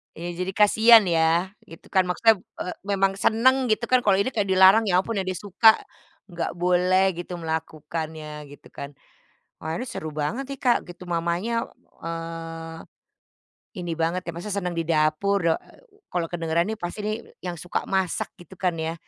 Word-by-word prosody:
Iya 170 +2 -6
jadi 190 - -3
kasihan 220 +2 +7
ya, 170 +1 +2 0.2
gitu 165 - -14
kan 190 -1 +4
maksudnya 220 +5 +4 0.3
e - - 0 0.2
memang 195 -1 +2
seneng 260 +3 +3
gitu 220 +2 +1
kan 255 - +6
kalau 200 -2 +5
ini 200 +6 +1
kayak 205 -3 -1
dilarang, 190 +4 +6
ya 180 -1 +4
ampun 225 0 -4
yang 190 - -3
dia 185 - -2
suka 205 +4 +5 0.6
nggak 170 -1 -3
boleh 180 +2 +3
gitu 175 0 -6
melakukannya 155 -1 -5
gitu 145 - -14
kan. 140 0 -7 0.7
Wah 160 +1 -3
ini 250 - -4
seru 155 - -5
banget 155 - -2
nih, 275 - -6
Kak, 245 -2 +4
gitu. 175 +1 -10
Mamanya, 175 +8 -1 0.4
eee, 165 0 -6 1.0
ini 175 -1 -4
banget 165 +3 0
ya, - - -2
masih 205 +4 -6
senang 180 -3 -2
di 165 - 0
dapur. 160 +5 +2
Da 165 - +4
eee, - - -21 0.3
kalau 170 -2 0
kedengeran 170 0 0
nih 220 - -3
pasti 175 +4 -5
nih 215 +1 -1 0.3
yang 175 -2 -5
suka 175 - -2
masak 190 -3 0
gitu 175 +2 -14
kan 180 -3 0
ya. 160 +1 -2
180 Hz, 175 wpm, -24 LUFS, 165-200 Hz, 1.0 s, kasihan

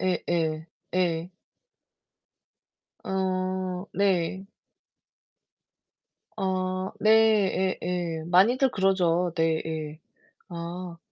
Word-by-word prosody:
예예. 165 -4 -1 0.3
예. 175 -1 0 1.7
어. 185 -1 -2
네. 190 -1 0 1.9
아. 185 0 -1
네, 215 -4 +4
예예. 170 -3 -2
많이들 230 +10 +4
그러죠 180 -3 +2
네, 160 -1 +1
예. 155 -1 -5 0.5
아. 170 0 -6
185 Hz, 95 characters per minute, -26 LUFS, 170-190 Hz, 1.9 s, 네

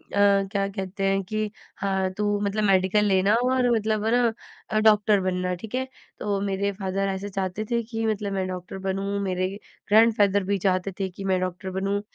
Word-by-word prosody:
अ, 200 -1 +4
क्या 200 -2 0
कहते 195 0 -5
हैं 195 0 +2
कि 215 +3 -2 0.3
हाँ, 190 -1 0
तू 205 0 +1
मतलब 205 +1 0
मेडिकल 195 +1 +3
लेना 195 0 +3
और 255 -1 +2
मतलब 215 -1 0
है 225 - +2
ना, 240 -1 +3 0.4
अ, 215 - +1
डॉक्टर 210 -1 +4
बनना, 180 -1 -1
ठीक 215 +6 -7
है। 260 0 -1 0.3
तो 200 -1 -1
मेरे 200 0 -1
फादर 195 0 -2
ऐसे 195 +2 -5
चाहते 195 +2 -3
थे 235 0 +2
कि 225 0 -4
मतलब 210 -2 -1
मैं 190 -1 -1
डॉक्टर 185 +1 -6
बनूँ, 195 +1 -2
मेरे 185 -1 0 0.4
ग्रैंडफादर 210 -2 +4
भी 200 +2 0
चाहते 185 +1 +1
थे 190 -1 -1
कि 195 - -9
मैं 185 - +2
डॉक्टर 185 +1 -3
बनूँ। 200 +1 -1
200 Hz, 195 wpm, -25 LUFS, 190-215 Hz, 0.4 s, अ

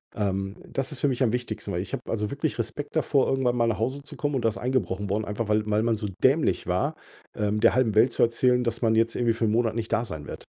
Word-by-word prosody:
Ähm, 95 -2 -2
das 135 +1 -3
ist 145 - -6
für 145 - +2
mich 130 +1 -2
am 120 - +3
wichtigsten, 125 -1 -3
weil - - -1
ich - - -8
habe - - -2
also 105 -2 -2
wirklich 140 0 -2
Respekt 145 +7 -4
davor, 145 -3 +2
irgendwann 130 -2 +1
mal 115 - +3
nach 115 - 0
Hause 130 +7 -2
zu 145 - -10
kommen 145 -1 -2
und 120 -3 -1
da - - +5
ist 105 - -6
eingebrochen 105 -6 -1
worden, 105 +1 0
einfach 105 +2 -3
weil 105 0 +1
weil 105 +1 +2
man 115 -1 +2
so 105 - -3 0.2
dämlich 140 +4 +3
war, 135 - 0 0.4
ähm, 105 0 0
der - - +4
halben 125 -4 +2
Welt 115 +4 +4
zu - - +3
erzählen, 125 +1 +3
dass 115 -1 -2
man 110 -2 +3
jetzt 115 +1 +2
irgendwie 120 -2 +2
für 115 0 -1
1 105 - +1
Monat 115 0 +1
nicht 115 -1 -3
da 115 +1 +1
sein 80 -8 -7
wird. - - -8
115 Hz, 280 wpm, -26 LUFS, 105-130 Hz, 0.4 s, da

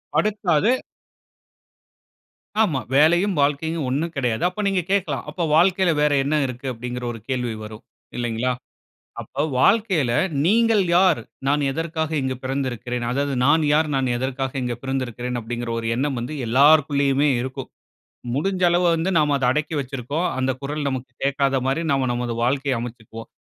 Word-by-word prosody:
படுத்தாது. 205 -2 +2 1.9
ஆமா. 165 -11 +2 0.2
வேலையும் 175 +7 +4
வாழ்க்கையும் 150 +2 0
ஒண்ணு 140 +5 0
கிடையாது. 120 -5 -1
அப்ப 185 +4 -5
நீங்க 195 -2 +1
கேட்கலாம். 175 -10 0
அப்ப 170 +3 -3
வாழ்க்கையில 180 +1 +4
வேற 150 0 +3
என்ன 145 +3 0
இருக்கு? 125 +1 -6
அப்டீன்ங்கிற 125 +1 -5
ஒரு 115 - -9
கேள்வி 125 -3 -1
வரும் 110 0 -10 0.3
இல்லைங்களா? 120 +1 -1 0.7
அப்ப 140 - -6 0.2
வாழ்க்கையில 185 - +3 0.3
நீங்கள் 225 +2 +4
யார்? 180 -7 +4 0.3
நான் 145 +1 +2
எதற்காக 160 +1 -3
இங்கு 130 -1 -2
பிறந்திருக்கிறேன்? 125 -2 -3
அதாவது, 140 +2 -1
நான் 155 +3 +4
யார்? 155 +1 +3
நான் 135 -1 +1
எதற்காக 130 +1 -3
இங்கு 120 -1 -2
பிறந்திருக்கிறேன்? 125 -2 -3
அப்டீங்கிற 120 +1 -5
ஒரு 115 - -4
எண்ணம் 135 +1 -1
வந்து 125 +6 -5
எல்லாருக்குள்ளேயுமே 140 +2 +4
இருக்கும். 130 +1 -6 0.7
முடிஞ்ச 185 +6 -1
அளவு 175 +1 +2
வந்து 165 +3 0
நம்ம 150 -1 +2
அத 130 - 0
அடக்கி 150 +4 -1
வச்சிருக்கோம். 135 +5 -3
அந்த 130 0 +1
குரல் 145 +1 -3
நமக்கு 130 -2 -4
கேட்காத 135 0 +1
மாரி 135 +5 0
நம்ம 135 -2 +1
நமது 120 -1 -2
வாழ்க்கைய 135 +2 +1
அமச்சிக்குவோம். 115 -1 -8
140 Hz, 145 wpm, -22 LUFS, 125-160 Hz, 1.9 s, வேலையும்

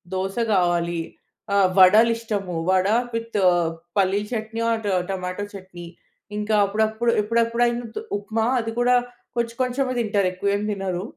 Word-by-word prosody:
దోస 190 +1 -2 0.2
కావాలి 175 -2 +1 0.5
ఆహ్, 195 -2 +4
వడలు 210 +5 +7
ఇష్టము. 205 -5 -4 0.2
వడ 185 0 +3 0.3
విత్ 230 0 -5 0.6
పల్లీ 195 0 +3
చట్నీ 225 0 -3
ఆర్ 225 -1 -1 0.3
టమాటో 185 +1 -3
చట్నీ. 185 -3 -10 0.5
ఇంకా 210 +1 -1
అప్పుడప్పుడు 220 +3 0
ఎప్పుడప్పుడైనా 235 +2 +1 0.3
ఉప్మా 220 +2 -2
అది 225 -1 -3
కూడా 245 +1 +3 0.4
కొంచెం 235 -1 -2
కొంచెమే 255 +1 0
తింటారు. 205 -4 +1
ఎక్కువ 185 +2 -4
ఏం 205 - -2
తినరు. 190 -3 -3
210 Hz, 130 wpm, -23 LUFS, 190-230 Hz, 0.6 s, వడలు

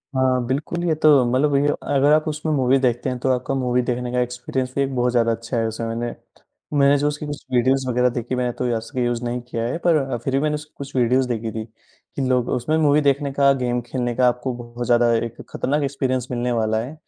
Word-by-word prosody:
हाँ, 130 -1 +2
बिल्कुल, 155 +7 -2
ये 165 - +2
तो 155 - +7 0.2
मतलब 140 +2 +2
ये 145 +1 +3
ओ - - 0 0.2
अगर 145 +2 +4
आप 155 +1 +2
उसमें 155 +1 -2
मूवी 135 -1 +3
देखते 125 0 0
हैं, 125 - -3
तो 130 - -1
आपका 125 +2 -2
मूवी 125 -1 +1
देखने 125 0 -2
का 125 - 0
एक्सपीरियंस 125 +1 -3
भी 140 0 +2
बहुत 125 0 +1
ज़्यादा 115 -1 +2
अच्छा 115 +2 -3
है। 115 0 +1
उसे 110 +1 -5
मैंने 120 +1 -3 0.7
मैंने 140 +1 +5
जो 145 +1 +1
उसकी 150 +1 -3
कुछ 145 -1 -6
वीडियोज़ 130 +2 +2
वगैरह 125 +1 +2
देखी, 120 +1 -3
मैंने 125 -1 0
तो 125 - 0
असली 125 +2 -3
यूज़ 120 0 -1
नहीं 120 0 -2
किया 115 -1 -4
है। 145 - -2
पर 170 -2 +5
अ, 135 -4 -2
फिर 130 +4 -4
भी 135 - +3
मैंने 150 0 0 0.2
कुछ 140 -1 -8
वीडियोज़ 125 +1 +2
देखी 115 -2 -3
थी 110 0 -5
कि 115 +4 -12
लोग 125 -2 +1
उसमें 155 +6 0
मूवी 150 -1 +4
देखने 140 0 +1
का, 140 0 +4
गेम 125 -2 -1
खेलने 120 0 -3
का 125 -1 +3
आपको 125 +1 -1
बहुत 120 0 -7
ज़्यादा 120 0 +3
एक 115 0 -9
खतरनाक 145 +2 -1
एक्सपीरियंस 130 -2 -1
मिलने 125 0 -1
वाला 110 -1 +1
है। 135 +5 -7
125 Hz, 235 wpm, -22 LUFS, 120-140 Hz, 0.7 s, तो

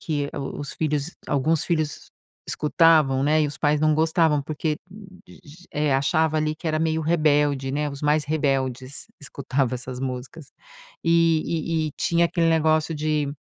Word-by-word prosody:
que 145 -3 -2
o 135 - -5
os 145 - -6
filhos 150 +1 -2 0.2
alguns 150 +3 +1
filhos 155 -4 -2 0.4
escutavam, 150 -4 +3
né, 155 +2 +3
e - - +2
os 145 0 -7
pais 150 0 +1
não 155 0 +3
gostavam 160 -2 +2
porque 155 +1 -2 0.5
g 165 +5 -16
eh, 150 -1 0
achava 155 +3 +1
ali 155 0 0
que 170 - -8
era 155 0 0
meio 160 0 0
rebelde, 145 -4 +2
né. 150 +2 -1
Os 140 0 -9
mais 150 0 +2
rebeldes 135 -3 -2
escutavam 135 -2 -2
essas 125 0 -6
músicas. 130 +3 -6 0.5
E 165 -1 +1
e - - -2
e 150 - -9
tinha 170 0 +2
aquele 170 -1 +1
negócio 160 0 +2
de 150 -1 -1
150 Hz, 160 wpm, -24 LUFS, 140-160 Hz, 0.5 s, escutavam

